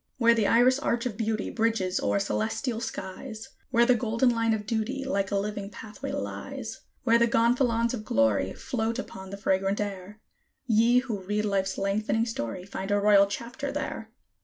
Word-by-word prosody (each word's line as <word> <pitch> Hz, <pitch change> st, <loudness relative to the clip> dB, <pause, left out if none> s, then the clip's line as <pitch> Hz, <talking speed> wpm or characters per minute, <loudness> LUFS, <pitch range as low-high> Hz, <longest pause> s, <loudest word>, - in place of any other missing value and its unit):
Where 235 Hz, -2 st, +5 dB
the 220 Hz, -3 st, +2 dB
iris 250 Hz, +3 st, +5 dB
arch 235 Hz, -4 st, 0 dB
of 240 Hz, -5 st, -2 dB
Beauty 220 Hz, -1 st, -2 dB
bridges 220 Hz, -5 st, 0 dB
o'er -, -, +1 dB
celestial 220 Hz, +4 st, -1 dB
skies, 220 Hz, +1 st, -6 dB, 0.2 s
Where 235 Hz, -2 st, +4 dB
the 250 Hz, -, +5 dB
golden 230 Hz, +1 st, +2 dB
line 230 Hz, -1 st, +1 dB
of 215 Hz, -1 st, -1 dB
Duty, 240 Hz, +5 st, -2 dB
like 200 Hz, -7 st, 0 dB
a 200 Hz, -, -1 dB
living 205 Hz, 0 st, -3 dB
pathway 220 Hz, +7 st, -7 dB
lies, 285 Hz, -, -5 dB, 0.2 s
Where 235 Hz, -2 st, +4 dB
the 235 Hz, -, +4 dB
gonfalons 235 Hz, 0 st, +2 dB
of 220 Hz, -4 st, -4 dB
Glory 110 Hz, -, +2 dB
float 230 Hz, -1 st, -2 dB
upon 190 Hz, -7 st, -7 dB
the 200 Hz, -, -6 dB
fragrant 195 Hz, 0 st, +1 dB
air, 200 Hz, 0 st, -5 dB, 0.5 s
Ye 230 Hz, +1 st, +4 dB
who 225 Hz, -5 st, -4 dB
read 210 Hz, +3 st, -1 dB
Life's 195 Hz, -2 st, 0 dB
lengthening 210 Hz, +3 st, 0 dB
story, 180 Hz, -, -4 dB
find 195 Hz, 0 st, -5 dB
a 205 Hz, 0 st, +3 dB
Royal 200 Hz, -1 st, +6 dB
Chapter 240 Hz, +7 st, -5 dB
there. 280 Hz, -6 st, -4 dB
220 Hz, 175 wpm, -27 LUFS, 200-235 Hz, 0.5 s, Royal